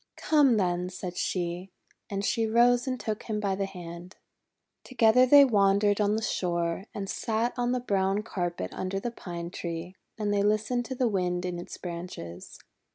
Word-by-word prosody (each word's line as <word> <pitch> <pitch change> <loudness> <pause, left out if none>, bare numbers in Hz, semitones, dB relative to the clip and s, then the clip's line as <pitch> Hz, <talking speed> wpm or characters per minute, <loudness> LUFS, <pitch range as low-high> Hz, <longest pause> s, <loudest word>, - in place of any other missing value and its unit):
"Come, 285 -7 +4
then," 180 -2 0
said 180 -1 -6
she. 180 +1 -2 0.4
And 200 0 -2
she 225 +2 +1
rose 240 +3 +4
and 255 -1 -2
took 215 -1 -3
him 215 -2 -3
by 200 -2 0
the 195 0 -2
hand. 175 -1 -9 0.7
Together 250 0 +4
they 285 +2 +9
wandered 205 -2 +3
on 205 +1 +2
the 220 - -2
shore, 170 -1 -1
and 200 -1 -5
sat 225 +4 -1
on 245 0 0
the 250 - +1
brown 195 -3 0
carpet 175 - -3
under 185 +1 -3
the 240 +4 -3
Pine 170 -5 -7
Tree, 170 +2 -5 0.2
and 210 -2 -1
they 200 - +2
listened 215 +4 +1
to 260 - -5
the 250 -1 +1
Wind 180 -3 -1
in 175 -1 -3
its 175 - -8
branches. 170 - -7
200 Hz, 175 wpm, -28 LUFS, 180-225 Hz, 0.7 s, they